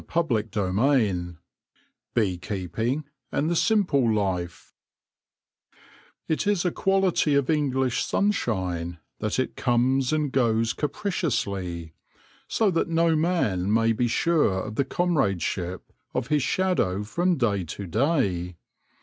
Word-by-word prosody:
CHAPTER 155 -11 +1
XVII 100 -3 +1 0.8
BEE 100 -6 +1
KEEPING 110 - -2 0.3
AND 155 +4 0
THE - - +1
SIMPLE 170 - +2
LIFE 95 -5 -2 1.5
IT 160 +5 -1
is 200 -4 +1
a 180 - +2
quality 190 -6 +2
of 140 +1 +2
English 130 -5 +1
sunshine 95 - -1 0.2
that 110 - -1
it 130 - -1
comes 125 +1 +1
and 150 -3 0
goes 115 -3 +2
capriciously, 100 - -2 0.5
so 215 -3 +2
that 165 - 0
no 165 0 +3
man 135 - +1
may 115 +1 +3
be 120 +2 0
sure 120 - +2
of 110 - -6
the 140 +5 0
comradeship 100 - -1 0.2
of 125 0 -2
his 150 -1 +2
shadow 150 - 0
from 175 - 0
day 105 -7 +1
to 95 +4 -7
day. 95 - 0
120 Hz, 120 wpm, -25 LUFS, 95-160 Hz, 1.5 s, no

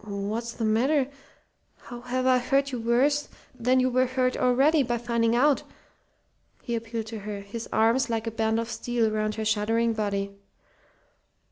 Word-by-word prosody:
"What's 210 +3 -4
the 225 - -3
matter? 260 +6 +2 0.7
How 240 0 -10
have 255 +1 -2
I 255 -1 +4
hurt 275 +2 +1
you 250 - -3
worse 260 +6 +1 0.2
than 255 +1 +2
you 255 - +3
were 255 +1 +2
hurt 255 0 0
already 270 +5 +3
by 240 -2 -1
finding 235 -1 0
out?" 280 +3 +3 1.0
he 235 - -4
appealed 230 -1 -3
to 220 0 -7
her, 205 0 -6
his 215 +3 -7
arms 235 +3 +2
like 225 -1 -1
a 225 - -2
band 220 0 0
of 230 - -3
steel 235 -1 -1
round 215 0 -1
her 220 - -3
shuddering 225 +2 +1
body. 200 -2 -2
235 Hz, 165 wpm, -26 LUFS, 220-255 Hz, 1.0 s, I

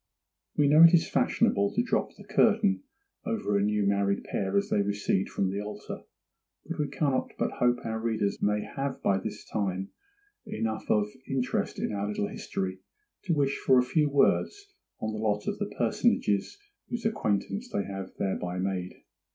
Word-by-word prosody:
WE 145 - +4
know 150 +3 +6
it 170 +1 +9
is 165 - +2
fashionable 100 0 +2
to - - +3
drop - - -1
the - - -13
curtain 95 -1 +3 0.4
over 105 - -1
a 100 - +3
new 105 0 +1
married 100 0 +1
pair 95 0 -1
as 100 - +1
they 105 - +3
recede 100 -1 0
from 95 -1 0
the 100 +1 -2
altar, 105 0 -7 0.6
but - - -5
we 150 - +1
cannot 135 -1 0
but - - 0
hope 125 0 +3
our 110 0 -2
readers 110 -3 -1
may 105 +1 +2
have 135 0 -4
by 95 -1 +3
this - - -6
time 95 -2 -2 0.6
enough 110 - -3
of 105 -1 +4 0.2
interest 130 -2 -1
in - - -2
our 100 0 -2
little 105 -1 -1
history 95 0 -4 0.5
to 170 -4 +1
wish 140 -1 +1
for 130 - +4
a 125 - +5
few 150 +4 +2
words 400 - +1 0.3
on 110 - -2
the 110 - -4
lot 105 -1 0
of - - -2
the - - -2
personages 100 - +1 0.3
whose 235 -2 -4
acquaintance 210 - -1
they 100 - -1
have 95 -1 -6
thereby 90 -2 -2
made. 90 -1 -3
105 Hz, 175 wpm, -28 LUFS, 100-135 Hz, 0.6 s, it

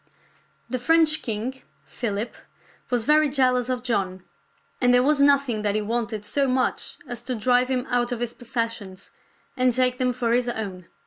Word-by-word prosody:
The 255 - -3
French 320 +3 +3
king, 235 +4 -4 0.2
Philip, 220 -1 -3 0.6
was 245 -3 0
very 305 0 +4
jealous 255 -3 +2
of 250 -1 -2
John, 190 -6 -2 0.6
and 245 -1 +4
there 245 0 +5
was 290 +1 +3
nothing 280 -6 +3
that 205 -1 0
he 215 - +1
wanted 220 -1 -3
so 275 +6 +1
much 255 0 -1
as 240 -1 -4
to 255 +1 -3
drive 245 +3 +2
him 255 -1 -1
out 245 0 0
of 245 - -2
his 240 -1 -3
possessions 230 -5 -5 0.4
and 255 0 +3
take 250 +1 +1
them 255 -1 +2
for 235 -1 -1
his 245 0 +1
own. 195 -6 -5
245 Hz, 175 wpm, -24 LUFS, 225-255 Hz, 0.6 s, there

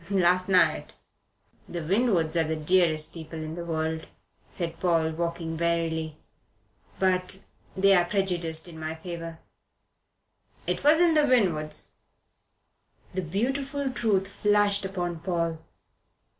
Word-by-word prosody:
"Last 185 -1 +3
night." 185 -1 +3 0.8
"The 175 -2 -4
Winwoods 180 -3 +1
are 165 - +3
the 160 - -1
dearest 155 -1 +3
people 160 -1 -8
in 155 0 -5
the 170 +1 -5
world," 160 -1 -2 0.4
said 170 -2 -5
Paul, 165 -3 +2
walking 170 0 -3
warily, 165 -2 -1 0.8
"but 185 0 0 0.4
they 195 +1 +5
are 175 -2 +4
prejudiced 175 -4 -1
in 165 -2 -10
my 155 0 -4
favour." 165 0 -7 1.3
"It - - -2
wasn't 320 +3 +5
the 300 -2 +4
Winwoods." 175 -12 +1 1.2
The 185 - -1
beautiful 265 - -2
truth 210 -6 +1
flashed 205 0 +2
upon 175 -3 -3
Paul. 165 -2 -2
175 Hz, 115 wpm, -27 LUFS, 160-195 Hz, 1.3 s, they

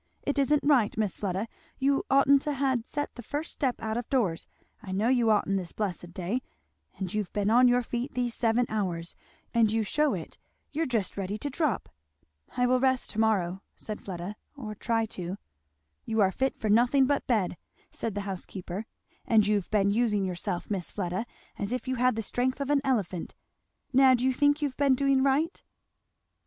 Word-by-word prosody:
"It 285 0 0
isn't 285 +1 +3
right, 260 -9 +3
Miss 210 -4 0
Fleda. 195 +2 -2 0.3
You 275 +1 +2
oughtn't 275 0 +5
to 295 -1 -2
ha' 270 0 +1
set 290 +2 -3
the 245 - -8
first 290 +7 -4
step 260 -4 -1
out 220 0 -1
of 240 - -4
doors, 205 -12 0 0.3
I 200 -5 -8
know 205 +5 +1
you 245 -3 +3
oughtn't, 200 -2 +2
this 180 -3 -5
blessed 180 -4 -3
day; 190 +8 -2 0.6
and 190 -3 -4
you've 210 -3 -2
been 205 0 +1
on 250 +2 +6
your 245 0 +3
feet 240 +3 -4
these 245 -1 0
seven 230 +1 +2
hours, 175 -6 -3 0.4
and 225 -2 +4
you 225 0 +1
shew 300 +8 +1
it! - - -8 0.3
You're 320 +1 -1
just 225 -7 -1
ready 200 +1 -2
to 285 +6 -4
drop." 285 - 0 0.7
"I 250 - +3
will 255 +1 +3
rest 260 -1 +1
to 220 - -4
morrow," 195 -4 +1
said 215 -1 -6
Fleda, 185 +2 -6 0.2
"or 215 -6 -6
try 225 +1 0
to." 185 -3 -5 0.7
"You 225 0 -1
are 190 -1 +4
fit 265 +6 -1
for 220 - -3
nothing 245 +6 +4
but 285 +1 0
bed," 210 -8 +1 0.4
said 225 -3 -4
the 205 - -1
housekeeper, 190 +1 -5 0.4
"and 220 -3 +4
you've 205 -3 0
been 200 -2 +3
using 210 -3 +1
yourself, 180 +1 -3
Miss 190 -4 -2
Fleda, 185 +3 -3 0.3
as 200 +1 -3
if 250 +1 -3
you 260 0 -1
had 250 -1 +3
the 225 - -2
strength 255 +5 -1
of 280 0 -1
an 285 -1 +3
elephant. 205 -10 -1 0.6
Now 260 0 +7
do 245 +1 -1
you 260 - +3
think 290 +3 +2
you've 275 -3 -2
been 275 -2 +4
doing 275 0 +3
right?" 280 +5 +1
225 Hz, 195 wpm, -28 LUFS, 200-265 Hz, 0.7 s, Now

